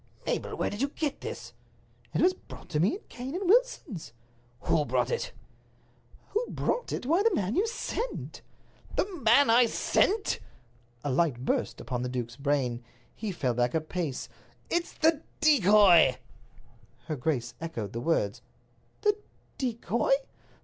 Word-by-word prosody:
"Mabel, - - -2
where - - -1
did 205 +3 -5
you 275 - +3
get 290 0 -3
this?" - - -7 0.6
"It - - 0
was 365 +1 +5
brought - - -13
to 150 - 0
me 185 - +3
in 415 - -9
Cane 260 +5 -6
and 375 0 -2
Wilson's." 350 - +1 0.5
"Who 150 - +2
brought - - 0
it?" 475 - -2 1.0
"Who 440 +3 0
brought 485 - -1
it? - - -3
Why, 330 +8 +3
the 445 -3 +3
man 200 - -1
you 405 +5 +2
sent." 475 +1 -4 0.5
"The - - +2 0.2
man 230 +3 +6
I 240 +1 +6
sent!" 405 - +1 0.6
A 145 - -1
light 130 -3 +1
burst - - 0
upon 125 -1 -3
the 125 - -2
duke's 120 -2 -4
brain. 135 -4 0 0.3
He 215 -2 -4
fell 130 -8 -1
back 120 +2 +1
a - - +4
pace. 155 -3 -4 0.4
"It's 345 0 0
the 315 -1 +2 0.2
decoy!" 205 - +6 0.9
Her 155 - -2
grace 125 -4 -1
echoed 120 - -4
the 115 - -3
words: 110 -9 0 0.6
"The 420 -1 +3 0.4
decoy?" 255 - 0
200 Hz, 150 wpm, -29 LUFS, -, 1.0 s, man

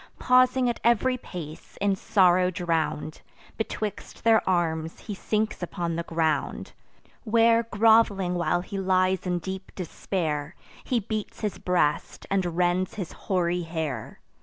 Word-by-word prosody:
Pausing 255 0 +4
at 240 - -1
ev'ry 240 +2 +3
pace, 165 -10 -9
in 200 -1 +2
sorrow 185 -1 +3
drown'd, 165 -4 -2 0.3
Betwixt 215 -1 -5
their 225 -1 +5
arms 165 -3 -1
he 210 - -6
sinks 215 +2 -2
upon 170 -1 -3
the 170 - -1
ground; 165 -2 -1 0.5
Where 230 0 +4
grov'ling 220 -4 +3
while 175 0 +1
he 195 +2 -5
lies 185 0 +1
in 180 0 +1
deep 190 +2 -6
despair, 160 -4 -3 0.3
He 250 - 0
beats 215 +1 -5
his 210 -2 -3
breast, 170 -4 0
and 180 -4 0
rends 180 +1 +1
his 190 -6 -5
hoary 180 -2 -1
hair. 160 -8 -4
185 Hz, 135 wpm, -26 LUFS, 170-215 Hz, 0.5 s, their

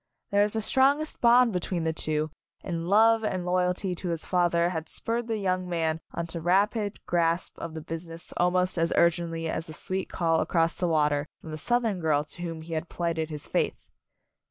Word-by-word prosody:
There 200 0 +4
was 205 0 +2
the 220 -1 -1
strongest 280 +6 +2
bond 240 -1 +5
between 180 -1 -1
the 160 0 0
two, 155 0 0 0.3
and 170 0 -3
love 225 +2 +5
and 185 -4 -2
loy 180 +1 +2
alty 180 +1 -1
to 180 - -3
his 165 -2 -1
father 175 -1 +2
had 160 -3 -4
spurred 230 +1 -1
the 225 -1 -1
young 185 -2 -1
man 160 -2 0
on 170 - -3
to 165 0 -5
rapid 205 +4 +1
grasp 170 0 +1
of 165 -1 -6
the 160 - -5
business 165 +1 -7
al 175 - +4
most 180 0 0
as 165 0 +1
urgently 170 -1 +1
as 160 0 -3
the 155 - -8
sweet 190 +4 -3
call 165 -2 +1
across 165 -1 +1
the 180 - -1
water 150 -2 +2
from 160 - -10
the 155 - -4
Southern 235 -4 0
girl 155 -3 +2
to 160 +3 -10
whom 165 -2 -5
he 165 +1 -7
had 160 +1 -3
plighted 165 -2 -2
his 150 -2 -7
faith. - - -2
175 Hz, 205 wpm, -27 LUFS, 165-190 Hz, 0.3 s, bond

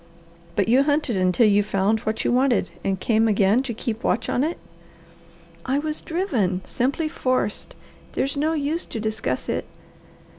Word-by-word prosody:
"But 200 - +1
you 250 +4 +5
hunted 290 -4 +1
until 185 +5 +3
you 205 -1 +5
found 205 +1 +1
what 220 +1 -3
you - - +2
wanted, 250 -1 +2
and 195 -1 -1
came 225 +2 +2
again 205 +2 +3
to 265 -2 -4
keep 225 0 -4
watch 230 - 0
on 250 - +1
it?" 325 +3 -1 1.1
"I 265 +2 0
was 305 +1 -2
driven 235 - -1
simply 275 +6 -1
forced. 255 -7 -1 0.4
There's 275 +2 -1
no 305 +3 +1
use 310 +3 -1
to 225 - -5
discuss 220 0 -2
it!" - - -2
235 Hz, 160 wpm, -23 LUFS, 210-280 Hz, 1.1 s, you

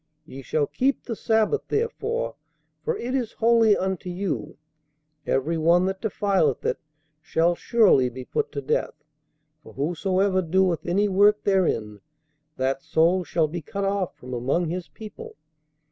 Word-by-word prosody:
Ye 135 -3 -9
shall 145 +3 0
keep 270 - 0
the 230 - -4
sabbath 220 - +1
therefore; 465 +2 -2 0.5
for 470 -1 -1
it 250 -6 -4
is 250 -5 -1
holy 225 -2 +4
unto 190 -1 -3
you; 180 -1 -4 0.7
every 160 +5 0
one 170 +3 +4
that 190 0 -3
defileth 195 - 0
it - - 0 0.4
shall 165 +1 +1
surely 185 - +3
be 130 +1 -9
put - - -2
to 140 - -4
death; - - -1 0.7
for - - -14
whosoever 185 +6 0
doeth 180 0 +1
any 200 +4 +2
work 205 +2 +4
therein, 115 - 0 0.6
that 135 +1 -1
soul 170 +6 +2
shall 160 0 0
be 170 +3 -5
cut 200 +6 -4
off 195 -2 -1
from 125 0 -9
among 135 +8 0
his 175 +1 -4
people. 215 -2 -10
185 Hz, 145 wpm, -24 LUFS, 155-205 Hz, 0.7 s, holy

